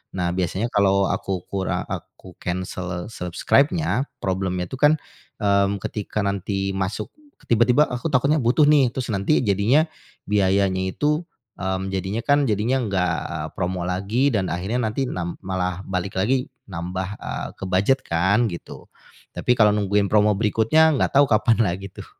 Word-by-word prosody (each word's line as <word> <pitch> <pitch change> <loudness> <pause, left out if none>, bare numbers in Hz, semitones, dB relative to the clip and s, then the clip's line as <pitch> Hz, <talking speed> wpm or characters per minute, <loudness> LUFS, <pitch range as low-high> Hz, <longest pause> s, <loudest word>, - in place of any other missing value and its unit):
Nah, 90 -2 0
biasanya 95 +6 -1
kalau 100 -1 +3
aku 95 -2 -3
kura 95 -1 -1
aku 90 -2 -8
kensel 90 -1 -4
subscribe-nya, 140 - +1 0.2
problem-nya 95 -1 -1
itu 130 - -5
kan, 150 +1 +5 0.5
mmm, 100 -1 +2
ketika 105 0 -3
nanti 100 0 -1
masuk 95 +1 -3 0.4
tiba-tiba 120 +5 +4
aku 125 +3 -5
takutnya 140 +3 +2
butuh 125 +6 +4
nih, 140 -4 +5
terus 130 -2 -4
nanti 100 +10 +2
jadinya 110 - +3 0.4
biayanya 95 -2 +2
itu, 150 +2 +1 0.4
mmm, 95 0 -2
jadinya 95 +4 -2
kan 145 0 +3
jadinya 110 +6 +1
enggak, 95 -4 0 0.2
eee, 80 -2 -4
promo 90 0 -2
lagi 100 +10 +1
dan 100 -3 +1
akhirnya 95 +7 -2
nanti 115 +5 -1
nam 85 -1 -4
malah 90 0 -2
balik 95 0 -3
lagi 125 +5 +1 0.2
nambah, 90 +1 -4
eee, - - -4
ke - - -9
bujet 100 +9 +3
kan, 95 +8 +2
gitu. 85 - -9 0.5
Tapi 125 - +2
kalau 105 -2 +5
nungguin 100 0 +1
promo 105 0 +4
berikutnya, 115 +9 +3
enggak 135 - +1
tahu 145 - +7
kapan 115 +1 +3
lagi, 95 +2 -3
tuh. - - -9
100 Hz, 150 wpm, -23 LUFS, 95-120 Hz, 0.5 s, tahu